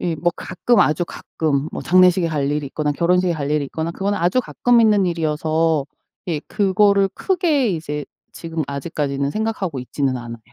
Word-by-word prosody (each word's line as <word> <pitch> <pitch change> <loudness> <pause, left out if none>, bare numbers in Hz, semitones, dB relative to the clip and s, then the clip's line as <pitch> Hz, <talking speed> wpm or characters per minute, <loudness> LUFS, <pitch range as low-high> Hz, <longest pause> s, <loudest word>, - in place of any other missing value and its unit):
예. 170 -2 -1
뭐 175 +3 +1
가끔 240 -1 +1
아주 155 +3 +2
가끔 150 -2 -2
뭐 - - -4
장례식에 180 -1 +4
갈 145 -3 -1
일이 150 -1 -2
있거나 150 +1 -2
결혼식에 180 +3 +2
갈 145 -3 -3
일이 150 -1 +1
있거나 160 +4 -4
그건 200 +3 -2
아주 180 +9 +1
가끔 245 -1 +2
있는 205 -4 +4
일이어서 160 -2 0 0.4
예. 155 -3 -1
그거를 200 0 +2
크게 330 - +1
이제 150 -3 -4 0.3
지금 165 -1 -4
아직까지는 140 -1 -2
생각하고 210 -8 -2
있지는 130 +1 -2
않아요. 115 -1 -8
165 Hz, 375 characters per minute, -20 LUFS, 150-190 Hz, 0.4 s, 장례식에